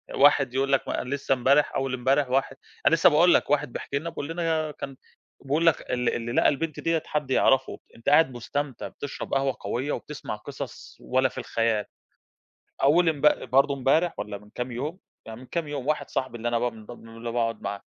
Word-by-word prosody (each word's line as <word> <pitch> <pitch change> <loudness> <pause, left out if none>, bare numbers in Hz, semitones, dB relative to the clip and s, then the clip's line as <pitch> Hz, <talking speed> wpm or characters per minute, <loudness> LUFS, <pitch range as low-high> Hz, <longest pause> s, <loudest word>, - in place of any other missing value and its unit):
واحد 135 -2 +5
يقول 135 +1 0
لك 135 - +2
ما - - -2
لسه 135 +1 -1
امبارح 135 +3 +3
أول 135 -1 -1
امبارح 130 +2 +1
واحد 135 +1 0 0.3
أنا 165 - +6
لسه 165 - +6
باقول 170 +3 +5
لك - - +2
واحد 140 -4 +1
بيحكي 140 - -3
لنا 170 +3 -5
بيقول 150 -3 -6
لنا 165 -2 -1
كان 135 -1 -7 0.5
بيقول 150 +5 +1
لك 165 - +4
ال 125 -1 +1
اللي 120 0 -4
لقى - - +4
البنت 155 +2 -3
ديّة 165 -1 0
حد 150 -3 -2
يعرفه 130 0 +3 0.2
أنت 115 - -2
قاعد 150 -2 +5
مستمتع 135 +2 -4
بتشرب 145 - -7
قهوة 135 -1 +1
قوية، 125 +8 -2
وبتسمع 150 -7 -5
قصص 135 +5 -9
ولا 130 +1 +1
في - - -16
الخيال، 115 -2 0 1.0
أول 165 +5 +5
امب 150 -1 +2
برضو 140 +2 +4
امبارح 140 +6 +2
والّا 100 -1 -5
من 105 +1 -19
كام 125 0 -4
يوم 145 +9 -4 0.3
يعني 110 +1 -8
من 130 - -12
كام 165 +2 -3
يوم 140 -3 -4
واحد 150 -2 -1
صاحبي 130 -2 -2
اللي 120 +1 -2
أنا 120 0 +1
بقى 120 +1 0
من 110 -1 -13
ب - - -10
اللي 115 0 -8
باقعد 115 -2 -1
معاه 100 - -4
135 Hz, 205 wpm, -26 LUFS, 120-150 Hz, 1.0 s, أنا